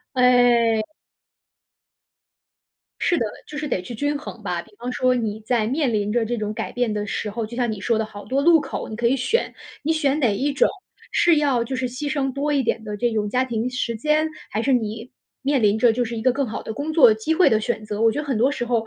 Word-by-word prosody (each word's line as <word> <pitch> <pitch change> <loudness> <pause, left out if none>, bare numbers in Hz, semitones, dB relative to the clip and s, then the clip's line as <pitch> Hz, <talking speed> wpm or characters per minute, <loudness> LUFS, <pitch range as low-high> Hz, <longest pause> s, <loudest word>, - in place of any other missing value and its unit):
哎。 240 -3 +4 2.1
是 350 - +3
的， 230 - 0 0.2
就 300 - -8
是 300 0 -3
得 190 - -1
去 210 +7 -8
均 290 +5 -1
衡 235 -6 -9
吧。 180 -3 -2
比 225 - -16
方 245 +2 -4
说 255 0 +2
你 220 -3 -2
在 225 0 0
面 265 0 0
临 210 0 0
着 235 -2 +1
这 240 +2 -2
种 210 -1 -3
改 - - -4
变 245 -3 -1
的 210 0 -2
时 210 - -3
候， 225 +1 -3
就 235 +2 -9
像 245 -2 0
你 205 - -6
说 230 -2 +1
的 220 - 0
好 205 -1 -10
多 275 +2 0
路 330 -1 +6
口， 275 - -5
你 - - -5
可 235 +1 0
以 265 +3 +3
选。 350 - 0 0.3
你 305 - -1
选 295 -2 +1
哪 240 -6 +3
一 285 +5 0
种？ - - +3 0.4
是 340 -2 +4
要 275 -5 +2
就 260 +3 -5
是 255 -1 -1
牺 265 +4 -4
牲 270 -2 -1
多 285 +3 -1
一 280 -2 +2
点 225 -1 -1
的 210 -1 -5
这 240 +1 +1
种 210 -1 -1
家 255 +2 +2
庭 235 -1 -2
时 245 -2 -2
间， 305 +6 +1 0.2
还 220 +2 -1
是 270 0 +2
你 225 0 -3 0.3
面 275 -3 +1
临 210 +1 +3
着 230 0 +5
就 245 +1 0
是 235 - -5
一 - - -3
个 255 - +4
更 275 +2 -1
好 225 - -5
的 220 - -6
工 300 +4 -3
作 250 -9 +7
机 220 +9 -1
会 360 - +5
的 220 - +3
选 220 0 -3
择？ 210 +1 -3
我 225 -1 +5
觉 290 - -2
得 300 - -5
很 265 - 0
多 255 +6 +3
时 240 -4 -3
候 230 -2 0
245 Hz, 275 characters per minute, -22 LUFS, 220-275 Hz, 2.1 s, 作